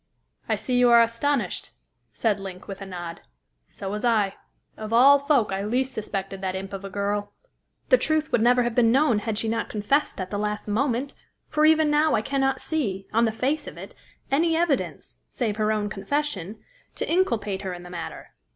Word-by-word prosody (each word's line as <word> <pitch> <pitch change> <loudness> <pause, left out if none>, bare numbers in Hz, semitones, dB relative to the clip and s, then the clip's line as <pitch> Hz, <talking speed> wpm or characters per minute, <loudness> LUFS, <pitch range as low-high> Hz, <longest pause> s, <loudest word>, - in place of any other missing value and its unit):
"I - - +3
see 250 -2 -1
you 245 -1 +5
are 235 0 +8
astonished," 235 +4 -1 0.4
said 215 -3 0
Link, 190 -2 -8
with 195 0 -7
a 195 - -6
nod; 175 -3 -7 0.5
"so 195 - -8
was 210 +2 -4
I. 215 -5 +2 0.4
Of 215 0 -7
all 270 +5 +7
folk, 280 -7 +2
I 195 +1 -2
least 255 +5 -1
suspected 195 -3 -4
that 190 -1 -2
imp 195 +1 -6
of 195 0 -6
a 195 - -6
girl. 205 +1 -2 0.6
The - - +6
truth 310 0 0
would 230 - +2
never 245 +1 +4
have 240 -1 -1
been 230 -1 +4
known, 265 -4 +3
had 215 0 -3
she 225 - -1
not 230 +1 -1
confessed 220 +7 0
at 185 0 -4
the 205 - -2
last 210 0 -3
moment; 250 +4 0 0.4
for 305 0 +2
even 315 -1 +4
now 300 +1 +3
I 215 - 0
cannot 270 0 0
see, 205 -12 -2
on 230 +2 +4
the 225 - +1
face 275 +7 -1
of - - -9
it, - - -9 0.4
any 325 +3 +2
evidence 330 -5 -1
save 215 -5 -2
her 215 0 +1
own 210 -1 0
confession 210 - -3 0.3
to - - -3
inculpate 230 - 0
her 190 -2 -4
in 175 - -10
the 180 - -11
matter. 170 -2 -7
225 Hz, 200 wpm, -25 LUFS, 200-275 Hz, 0.6 s, are